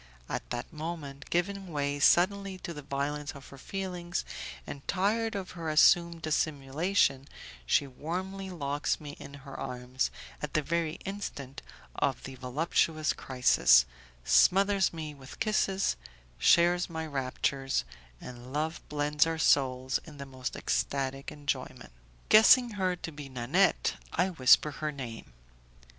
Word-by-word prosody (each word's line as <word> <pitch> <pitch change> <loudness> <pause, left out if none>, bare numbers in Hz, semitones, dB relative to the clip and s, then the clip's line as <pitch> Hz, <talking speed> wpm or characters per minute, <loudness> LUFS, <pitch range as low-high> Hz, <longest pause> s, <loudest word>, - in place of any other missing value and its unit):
At - - -4
that 120 +6 -5
moment, 150 -3 -6
giving 195 +3 -1
way 145 -1 -1
suddenly 195 +5 +3
to 170 - -4
the 150 - -8
violence 145 +1 -3
of 140 -1 -12
her 140 - -12
feelings, 180 0 -4 0.4
and 140 - -7
tired 215 +4 0
of 190 -2 -5
her 165 -2 -5
assumed 170 +1 +4
dissimulation, 145 -1 +1 0.4
she 140 - +3
warmly 185 +8 -5
locks 145 -4 -2
me 150 -1 -8
in 140 - -10
her 135 - -9
arms 125 +1 -3 0.3
at 150 +2 -5
the 155 - +2
very 165 0 -1
instant 145 -9 -6 0.3
of 135 - -1
the 135 - -7
voluptuous 155 +4 0
crisis, 65 - +4 0.4
smothers 195 - +4
me 155 -2 -6
with 135 -2 -13
kisses, 195 - +1 0.4
shares 175 +1 +4
my 160 -1 -4
raptures, 135 - -1 0.4
and 125 0 -10
love 155 +3 -2
blends 150 +1 +2
our 165 0 -1
souls 130 -4 +2
in 150 -3 -12
the 140 - -7
most 130 -1 -6
ecstatic 135 0 -2
enjoyment. 135 - -4 0.4
Guessing 235 +3 +7
her 190 -3 0
to 175 -2 -7
be 145 -2 -9
Nanette, 135 +10 +2 0.2
I 180 +3 +1
whisper 150 -2 +5
her 150 +2 -3
name. 125 -6 -8
150 Hz, 135 wpm, -30 LUFS, 135-175 Hz, 0.4 s, Guessing